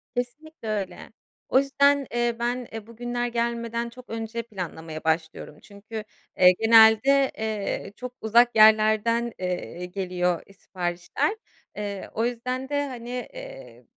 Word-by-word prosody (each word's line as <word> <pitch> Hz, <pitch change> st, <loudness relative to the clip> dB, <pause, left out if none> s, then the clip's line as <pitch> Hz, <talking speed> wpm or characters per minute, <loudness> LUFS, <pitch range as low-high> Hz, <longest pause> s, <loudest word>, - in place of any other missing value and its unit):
Kesinlikle 250 Hz, +3 st, -5 dB
öyle. 205 Hz, -3 st, -4 dB, 0.4 s
O 260 Hz, -, +5 dB
yüzden, 280 Hz, 0 st, +3 dB
eee, 240 Hz, -1 st, +1 dB
ben, 240 Hz, +1 st, -2 dB
eee, 225 Hz, -1 st, -7 dB
bugünler 240 Hz, +1 st, -3 dB
gelmeden 235 Hz, 0 st, -2 dB
çok 250 Hz, +1 st, -14 dB
önce 225 Hz, +1 st, -4 dB
planlamaya 165 Hz, -7 st, -7 dB
başlıyorum, 160 Hz, -1 st, -2 dB
çünkü, 215 Hz, +2 st, -9 dB, 0.3 s
eee, 180 Hz, 0 st, +8 dB
genelde, 225 Hz, +5 st, +6 dB
eee, 215 Hz, -2 st, -3 dB
çok 250 Hz, +1 st, -7 dB
uzak 235 Hz, +2 st, +4 dB
yerlerden, 220 Hz, +2 st, +5 dB
eee, 180 Hz, -1 st, -4 dB
geliyor, 180 Hz, -2 st, -1 dB
eee, 195 Hz, -, -17 dB
siparişler. 180 Hz, -, -2 dB, 0.4 s
Eee, 205 Hz, -2 st, -5 dB
o 225 Hz, -, 0 dB
yüzden 250 Hz, +2 st, -3 dB
de 285 Hz, 0 st, 0 dB
hani, 240 Hz, -3 st, -8 dB, 0.2 s
eee, -, -, -11 dB
230 Hz, 130 wpm, -25 LUFS, 200-245 Hz, 0.4 s, eee